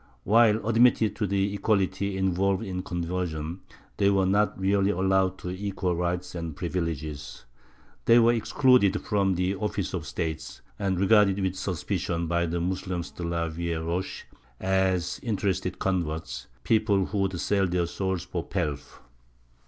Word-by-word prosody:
While 110 0 +4
admitted 115 -2 +4
to 105 - 0
the 100 +1 0
equality 100 -1 0
involved 95 +2 +1
in 95 -3 -3
conversion, 85 -2 -3 0.4
they 100 - +4
were 95 -1 +3
not 100 +1 +1
really 100 +1 +2
allowed 95 -1 +1
equal 95 -1 -2
rights 90 +1 -2
and 85 -3 -5
privileges; 80 -5 -4 0.6
they 115 - +6
were 120 0 +5
excluded 115 -3 +3
from 100 -3 +1
the 90 +2 0
offices 100 -1 -3
of 85 -5 -4
State, 80 +3 -4 0.2
and 95 -3 0
regarded 100 0 +4
with 95 -2 0
suspicion 90 -2 -2
by 85 +1 0
the 85 +1 -2
Moslems 90 0 -3
de - - -10
la 85 -1 -1
vielle 85 0 -3
roche 90 +3 -3 0.3
as 95 -2 +1
interested 100 -4 -1
converts, 80 -9 -2 0.2
people 105 -4 +2
who 100 +2 -3
would 95 -2 0
sell 100 0 +1
their 90 -1 0
souls 95 0 -2
for - - -4
pelf. 70 -1 -4
95 Hz, 145 wpm, -27 LUFS, 85-100 Hz, 0.6 s, they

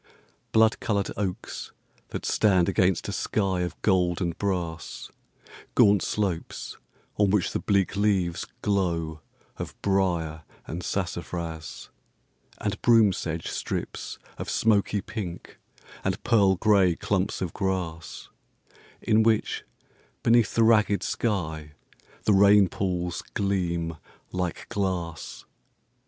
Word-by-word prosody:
Blood 110 0 +4
coloured 100 -4 -1
oaks, 95 -3 -4 0.3
that - - -5
stand 95 -5 +3
against 90 -1 +2
a - - -2
sky 95 -4 0
of 90 -2 -4
gold 90 -4 +2
and 85 -3 -1
brass; 90 -5 -3 0.6
Gaunt 100 -2 +6
slopes, 95 -6 -2 0.4
on 105 -1 +3
which 100 -2 +2
the - - 0
bleak 100 -1 +1
leaves 100 -4 +1 0.2
glow 85 -6 0 0.4
of - - -7
brier 85 -5 +1 0.2
and 85 +3 -5
sassafras, 85 -3 -4 0.7
And - - -3
broom 115 -4 +5
sedge 80 -2 -4
strips - - -4 0.2
of - - -4
smoky 105 -2 +2
pink 100 -6 -7 0.4
and 95 +3 -2
pearl 100 -5 +4
gray 95 -3 +4
clumps 100 +2 -1
of 90 -3 -3
grass, 90 -5 -3 0.8
In 110 +1 +4
which, 110 -1 +1 0.6
beneath 115 -3 +4
the 115 - +4
ragged 105 -2 +4
sky, 80 -9 -2 0.5
the 105 - +3
rain 100 0 +6
pools 90 -3 -2
gleam 85 -5 -1 0.4
like 90 -2 -3
glass. 90 -5 -3
95 Hz, 115 wpm, -26 LUFS, 85-105 Hz, 0.8 s, Gaunt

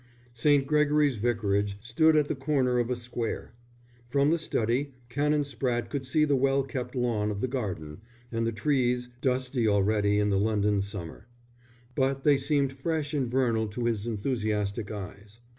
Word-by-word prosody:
St. 140 +3 +3
Gregory's 150 -2 +2
Vicarage 100 -3 0
stood 140 +8 +3
at 150 -1 +3
the - - -1
corner 135 -3 +1
of 120 0 0
a 125 - 0
square. 120 -2 -5 0.6
From 140 +3 +3
the 170 - +2
study 130 -1 -1
Canon 145 +3 +1
Spratte 120 -3 -2
could 135 -3 -3
see 150 +3 +3
the 145 -2 +2
well 135 +1 +2
kept 130 -2 -5
lawn 115 -4 0
of 100 -1 -3
the 130 - 0
garden, 95 - -4 0.3
and 115 0 -1
the - - 0
trees, 125 +1 0
dusty 125 -2 0
already 105 0 +2
in 105 0 +2
the 95 - +2
London 105 -1 +1
summer. 100 -1 -6 0.7
But 135 +1 0
they 145 -2 +5
seemed 140 0 +1
fresh 150 +1 -2
and 135 -5 0
vernal 115 -3 +1
to 115 +3 -4
his 115 -2 -1
enthusiastic 105 -2 -2
eyes. 100 +1 -8
125 Hz, 165 wpm, -28 LUFS, 105-140 Hz, 0.7 s, they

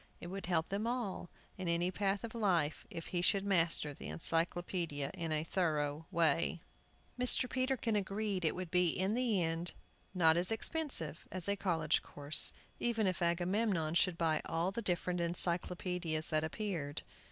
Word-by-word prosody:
It 175 - -7
would 195 -2 -5
help 165 -3 +1
them 205 +3 -1
all, 235 -8 -3 0.3
in 185 - -3
any 170 +2 +1
path 200 +1 0
of 230 - -5
life, 180 -10 +1
if 165 - -6
he 175 - +1
should 195 +2 +2
master 170 -6 +1
the - - -8
Encyclopædia 165 - 0
in 170 -4 -4
a 155 0 +1
thorough 155 -3 -1
way. 165 0 +1 0.6
Mr. 250 0 +5
Peterkin 255 -3 0
agreed 200 -1 -1
it 160 - +1
would 180 -2 -6
in 180 +3 +2
the 230 -6 +2
end 165 +1 -1
be 185 - -18
not 160 -1 +6
as 180 +4 +3
expensive 225 - -1
as 185 -1 -2
a 200 - +1
college 165 -5 +1
course, 145 +1 +2 0.3
even 225 -3 +1
if 185 -2 0
Agamemnon 175 0 +1
should 175 0 +3
buy 160 -2 +1
all 165 +3 0
the 235 - -3
different 180 -2 -1
Encyclopædias 170 -1 -1
that 155 0 +1
appeared. 160 -4 -3
175 Hz, 165 wpm, -35 LUFS, 165-200 Hz, 0.6 s, not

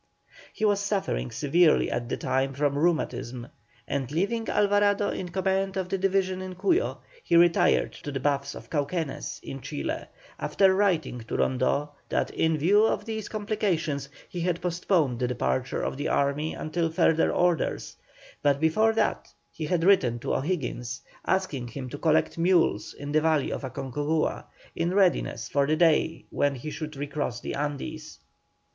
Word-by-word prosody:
He 220 - -2
was 205 -1 +3
suffering 195 - -1
severely 155 - +3
at 120 -1 -2
the - - -1
time 135 +1 0
from 140 0 +1
rheumatism, 130 -6 -1 0.4
and 135 -2 -2
leaving 215 +8 -1
Alvarado 205 0 +3
in 180 - -4
command 190 +1 0
of 185 -1 -2
the 195 - 0
division 190 -1 +1
in 185 -1 -6
Cuyo, 200 - +1 0.2
he - - +1
retired 170 0 +4
to 145 - -5
the 135 - -3
baths 140 +1 -1
of - - -11
Cauquenes 150 0 -2
in 135 - -7
Chile, 70 - -4 0.3
after 190 -1 +3
writing 185 -10 +1
to 115 - -4
Rondeau 130 +3 +1 0.2
that - - 0
in 160 -1 +1
view 195 +8 +4
of 225 - +1
these 220 -2 -4
complications 180 -10 -1 0.2
he 175 - -6
had 175 -1 0
postponed 170 -7 0
the 125 - +1
departure 65 - -1
of - - -2
the 145 - -2
army 140 +3 0
until 165 +1 -1
further 160 0 +3
orders; 175 -2 0 0.5
but 140 -1 +2
before 215 +9 +3
that 225 - 0 0.2
he 155 - -5
had 170 +1 0
written 165 -11 +4
to 120 - -3
O'Higgins 135 -5 -2 0.3
asking 160 -10 0
him 130 +1 -6
to 145 - -7
collect 160 +1 +2
mules 170 -2 +2
in 145 0 -6
the 155 +1 +3
valley 155 -3 +2
of - - -3
Aconcagua, 140 +4 -2 0.3
in 170 +3 -1
readiness 190 -3 +2
for 140 -1 +1
the 155 - +2
day 160 0 +2
when 145 -1 +1
he 145 +5 -6
should 155 -1 -6
recross 140 -3 -3
the - - -5
Andes. 150 +2 -4
160 Hz, 165 wpm, -27 LUFS, 140-185 Hz, 0.5 s, retired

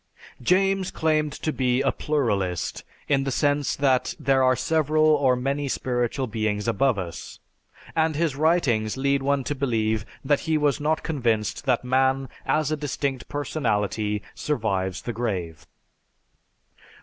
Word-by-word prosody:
James 190 +6 +2
claimed 155 -1 +1
to 155 +2 -3
be 125 0 +1
a 140 - +2
pluralist 100 - -1 0.2
in 135 -2 +2
the 135 - -2
sense 145 +1 +1
that 135 -3 +1
there 135 0 +2
are 130 0 +4
several 155 +2 +2
or 145 -4 +4
many 140 +3 -1
spiritual 125 0 -1
beings 110 -2 -2
above 115 +2 +2
us, 90 -3 -6 0.6
and 160 -1 +2
his 155 -2 0
writings 140 -9 +1
lead 140 +1 +1
one 140 0 +1
to 145 - -2
believe 110 -6 0 0.2
that 145 +1 +3
he 160 - +3
was 145 -1 +1
not 155 +2 0
convinced 120 -5 -1
that 125 -3 +2
man, 130 +1 +2 0.2
as 155 -1 +1
a - - +2
distinct 140 -3 -3
personality, 105 -7 -1
survives 95 -9 -2
the 120 - -3
grave. 95 -9 -4
135 Hz, 140 wpm, -25 LUFS, 115-150 Hz, 0.6 s, are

